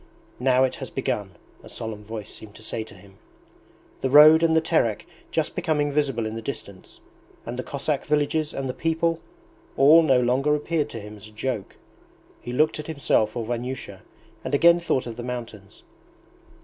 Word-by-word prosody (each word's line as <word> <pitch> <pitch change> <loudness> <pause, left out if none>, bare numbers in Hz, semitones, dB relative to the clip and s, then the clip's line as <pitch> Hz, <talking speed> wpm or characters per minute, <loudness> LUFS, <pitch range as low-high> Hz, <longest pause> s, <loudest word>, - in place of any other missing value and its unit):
'Now 130 0 +3
it 130 - 0
has - - -7
begun,' - - -3 0.3
a - - -13
solemn 110 -2 -7
voice 110 -1 -7
seemed 105 -2 -12
to 110 - -13
say 110 - -4
to 105 - -14
him. 95 +1 -18 0.8
The 130 - 0
road 155 +3 +8
and 165 -1 +3
the - - +6
Terek, 115 -10 0 0.2
just - - -1
becoming 145 -2 0
visible 135 -6 0
in 110 - -4
the 115 - -5
distance, 100 -6 -8 0.5
and 120 - -5
the 125 - -3
Cossack 140 +2 -3
villages 150 +1 0
and 135 -1 -4
the 130 - -3
people, 165 +2 0 0.6
all 150 +5 +7
no 135 -6 +4
longer 130 +4 +2
appeared 150 0 -1
to 115 - -7
him 105 0 -10
as 105 - -11
a - - -15
joke. 110 -1 -4 0.7
He 120 - -6
looked 155 +5 +1
at 150 - -6
himself 135 -8 0
or 115 - -3
Vanyusha, 120 -4 -5 0.4
and - - -1
again 170 +4 +6
thought 170 -6 -1
of 115 -2 -7
the - - -5
mountains. 115 -5 -8
130 Hz, 185 wpm, -24 LUFS, 110-150 Hz, 0.8 s, road